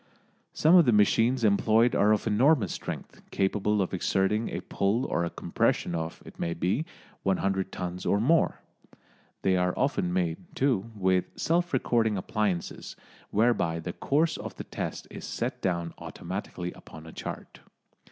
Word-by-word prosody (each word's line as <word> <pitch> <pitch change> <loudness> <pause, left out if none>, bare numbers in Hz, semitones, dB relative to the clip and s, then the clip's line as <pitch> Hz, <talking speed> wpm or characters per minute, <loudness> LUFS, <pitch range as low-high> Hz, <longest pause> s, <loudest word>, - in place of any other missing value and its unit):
Some 160 +3 +3
of 175 -3 +8
the 120 - +4
machines 115 +4 +3
employed 110 +3 +4
are 105 +1 +4
of 105 - +1
enormous 115 - +3
strength, - - -7
capable 100 +1 +1
of 90 - -5
exerting 95 +4 +1
a - - -4
pull 105 +6 0
or 85 - 0
a 85 - -1
compression 85 - 0
of, 80 0 -4
it - - -13
may 85 0 -1
be, 105 - 0 0.4
100 95 0 0
tons 90 0 -5
or 100 - +2
more. 160 +9 +2 0.8
They 95 -1 +3
are 90 0 0
often 130 -10 0
made, 90 -2 0 0.2
too, 120 -6 +1
with 95 -2 +2
self 170 +2 +1
recording 115 -5 +1
appliances, 95 -2 -2 0.3
whereby 105 -7 +2
the 85 +1 -5
course 155 +3 +1
of - - -7
the - - -6
test - - -5
is - - -8
set - - -3
down 85 -3 -1
automatically 90 0 -5
upon 80 - -13
a 80 - -10
chart. - - -7
100 Hz, 155 wpm, -28 LUFS, 90-120 Hz, 0.8 s, of